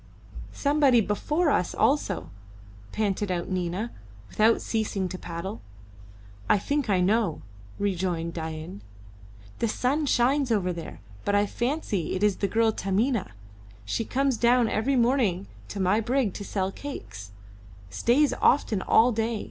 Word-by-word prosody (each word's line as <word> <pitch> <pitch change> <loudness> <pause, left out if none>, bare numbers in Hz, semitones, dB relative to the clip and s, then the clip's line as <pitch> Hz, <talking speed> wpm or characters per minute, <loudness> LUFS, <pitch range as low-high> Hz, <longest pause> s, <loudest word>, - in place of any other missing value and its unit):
"Somebody 280 -4 +3
before 295 - 0
us 180 - 0
also," 215 - 0 0.6
panted 205 -1 -1
out 175 -2 -2
Nina, 185 +4 -2 0.4
without 220 +2 +3
ceasing 210 -4 -2
to 185 - -6
paddle. 175 +5 -6 0.9
"I - - +5
think 285 +4 -1
I 190 -3 +3
know," 205 -3 +1 0.3
rejoined 180 -4 -1
Dain. 160 +3 -6 0.8
"The 230 - +1
sun 275 +7 0
shines 265 +1 +2
over 185 -5 +1
there, 165 - -8 0.2
but 205 - +1
I 205 0 +3
fancy 240 - -2
it 185 - -2
is 205 -2 +3
the 200 - 0
girl 225 +3 +2
Taminah. 210 - -1 0.5
She 100 - -1
comes 270 +1 0
down 240 +1 +4
every 240 +6 0
morning 235 -7 +2 0.2
to 200 - -6
my 190 +3 +2
brig 240 -3 0
to 205 - -6
sell 195 -1 -2
cakes 105 - -8 0.6
stays 270 - +2
often 225 -7 +3
all 235 +5 +4
day. 225 0 -1
210 Hz, 140 wpm, -26 LUFS, 185-245 Hz, 0.9 s, I